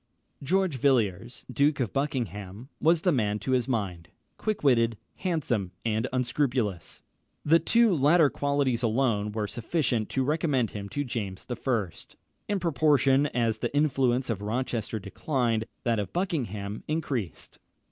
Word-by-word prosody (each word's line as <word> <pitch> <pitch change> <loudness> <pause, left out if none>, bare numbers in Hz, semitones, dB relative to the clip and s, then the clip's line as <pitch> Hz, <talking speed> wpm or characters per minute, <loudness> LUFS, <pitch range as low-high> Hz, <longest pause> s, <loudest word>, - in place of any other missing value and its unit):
George 180 +1 +1
Villiers, 115 -4 +1
Duke 140 +1 +2
of 120 -6 -1
Buckingham, 115 - -3
was 165 0 +4
the 180 - +4
man 105 -7 +1
to 105 +5 -4
his 125 -2 +2
mind: 95 -9 -3 0.3
quick 215 -6 -3
witted, 115 -5 +3 0.2
handsome, 125 - -1
and 110 +2 0
unscrupulous. 125 - -1 0.4
The 165 +3 +6
two 230 0 +3
latter 155 +2 +5
qualities 140 -4 0
alone 115 -3 +1
were 105 0 -2
sufficient 120 - -1
to 135 - 0
recommend 145 -5 +1
him 100 -1 -6
to 145 +8 -2
James 105 -7 -5
I. 120 -5 -1 0.6
In 205 -1 0
proportion 145 -3 +3
as 115 -4 0
the - - -2
influence 130 -4 +2
of 100 -3 -3
Rochester 115 0 -2
declined, 115 +2 -1 0.2
that 115 -2 +1
of 100 - -3
Buckingham 110 - -2
increased. 140 - -3
125 Hz, 135 wpm, -27 LUFS, 110-145 Hz, 0.6 s, The